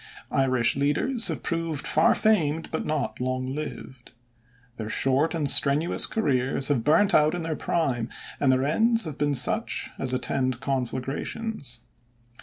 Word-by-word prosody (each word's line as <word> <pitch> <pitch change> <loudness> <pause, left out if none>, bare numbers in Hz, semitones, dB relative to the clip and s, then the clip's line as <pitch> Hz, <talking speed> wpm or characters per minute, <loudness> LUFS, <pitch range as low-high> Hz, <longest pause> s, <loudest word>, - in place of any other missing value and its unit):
Irish 130 -4 +2
leaders 150 - +1
have - - -3
proved 165 -4 -3
far 160 +2 +3
famed 165 -8 +1
but 160 - -3
not 150 -5 -3
long 130 +1 -2
lived. 135 -4 -8 0.6
Their 110 -1 -5
short 135 +8 +1
and 155 -3 -1
strenuous 145 +5 +3
careers 135 - 0
have 130 -6 +1
burnt 165 - +3
out 155 +2 +4
in 175 - -4
their 160 -1 -3
prime, 130 -10 -1 0.3
and 135 -2 +3
their 130 0 +1
ends 225 +8 +2
have 155 -2 -7
been 145 -1 +1
such 125 -1 +2
as 130 - +1
attend 130 -1 -2
conflagrations. 135 - -3
140 Hz, 145 wpm, -25 LUFS, 130-160 Hz, 0.6 s, out